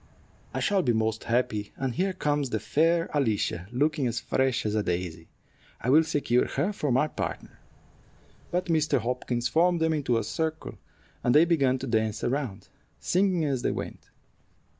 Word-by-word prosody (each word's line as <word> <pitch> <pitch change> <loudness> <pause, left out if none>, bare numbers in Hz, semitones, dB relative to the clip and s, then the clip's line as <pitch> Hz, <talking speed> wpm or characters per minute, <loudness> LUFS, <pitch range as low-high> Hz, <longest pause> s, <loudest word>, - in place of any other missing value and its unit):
"I - - -3
shall 200 -2 +2
be 125 -8 +1
most 110 0 -1
happy; 115 -3 -1
and 135 -2 -2
here 190 +6 0
comes 145 -5 0
the 110 - -1
fair 165 +6 +2
Alicia, 110 - 0
looking 145 +1 +1
as 115 -1 -1
fresh 130 -3 0
as 105 - 0
a 105 - +1
daisy. 85 -4 -3 0.5
I 125 - 0
will 155 +3 +7
secure 140 -6 +1
her 170 +10 -1
for 150 -8 -2
my 130 +5 +3
partner." - - -6 0.9
But 180 +1 -1
Mr. 155 -3 +2
Hopkins 120 0 -1
formed 175 +1 +3
them 160 0 +2
into 135 -6 +1
a 115 - 0
circle, 160 +8 -3 0.4
and 120 - +3
they 155 +3 +7
began 140 -7 +2
to 130 - -5
dance 110 -3 0
around, 120 -7 -2 0.3
singing 180 -3 +1
as 135 -4 -1
they - - 0
went. - - -6
130 Hz, 170 wpm, -27 LUFS, 115-160 Hz, 0.9 s, will